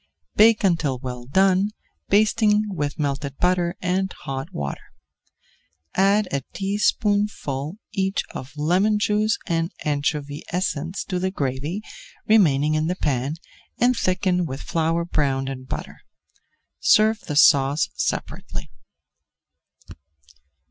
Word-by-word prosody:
Bake 220 +1 +5
until 165 -8 +1
well 125 -1 -6
done, 190 +7 +3 0.4
basting 210 0 +3
with 145 -4 -3
melted 140 -1 -2
butter 180 -1 +1
and 185 +1 0
hot 135 0 -6
water. 70 -1 -6 1.0
Add 200 +2 +3
a 140 - 0
teaspoonful 200 -6 0
each 195 0 0
of 140 +3 -8
lemon 185 +8 +2
juice 210 +1 +1
and 165 0 -1
anchovy 145 0 -1
essence 175 -1 -2
to 180 -2 -3
the 190 +1 0
gravy 145 +4 -3 0.4
remaining 155 -9 +4
in 155 +1 +1
the 180 - -1
pan 140 -3 -1 0.4
and 250 +2 +3
thicken 180 -3 +1
with 135 0 -6
flour 165 -1 0
browned 135 -5 0
in 130 -1 -7
butter. - - -6 0.8
Serve 220 +1 +4
the 150 - -6
sauce 145 -1 +5
separately. - - -4
170 Hz, 115 wpm, -23 LUFS, 145-195 Hz, 1.0 s, Bake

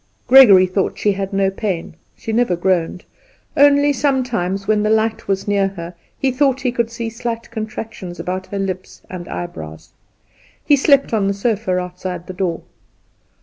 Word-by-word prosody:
Gregory 230 -8 +8
thought 185 +1 -1
she 210 - +1
had 195 0 -3
no 195 -1 +1
pain, 195 -6 -3 0.2
she 225 - -5
never 230 -5 +2
groaned; 180 0 -1 0.5
only 285 0 +5
sometimes, 245 -9 -1
when 215 -1 +2
the 215 - +1
light 220 0 0
was 195 0 -1
near 200 -1 +2
her, 175 -3 -8 0.2
he 270 - 0
thought 270 0 +1
he 250 -2 0
could 235 -1 -1
see 230 -1 -5 0.4
contractions 215 -5 -6
about 185 +1 -4
her 200 - -5
lips 185 -1 -5
and 180 -2 -7
eyebrows. 80 -2 -7 0.7
He 290 - +5
slept 280 -2 +3
on 205 -3 +2
the 200 - 0
sofa 200 -3 -1
outside 180 -1 -5
her 185 - -6
door. 180 -3 -2
200 Hz, 160 wpm, -19 LUFS, 185-235 Hz, 0.7 s, Gregory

